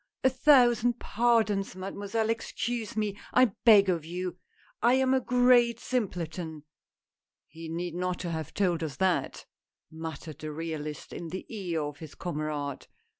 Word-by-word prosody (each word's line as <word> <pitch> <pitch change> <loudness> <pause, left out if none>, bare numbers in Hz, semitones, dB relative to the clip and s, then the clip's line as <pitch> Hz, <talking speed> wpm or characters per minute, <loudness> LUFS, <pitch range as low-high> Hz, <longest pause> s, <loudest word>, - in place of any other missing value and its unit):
a 260 - +5
thousand 245 -3 +4
pardons, 220 -5 +1
mademoiselle, 200 +4 -2
excuse 230 0 -3
me, 210 -2 0 0.2
I 250 -5 +5
beg 205 -4 +8
of 170 -4 0
you, 180 +2 -5 0.4
I 240 +3 +5
am 265 0 +3
a 260 - +3
great 245 -1 +4
simpleton! 170 - -3 0.3
" - - -65
" - - -65
He 165 +2 -10
need 170 +1 -3
not 180 +1 -2
have 160 -2 -4
told 175 -4 +1
us 155 -4 -3
that," 190 -2 0 0.5
muttered 160 -2 -7
the 155 -1 -5
realist 155 -2 -5
in 170 - -6
the 185 +4 -6
ear 175 -6 -2
of 145 -1 -6
his 155 -3 -10
comrade. 150 -4 -4
185 Hz, 150 wpm, -29 LUFS, 160-230 Hz, 0.5 s, beg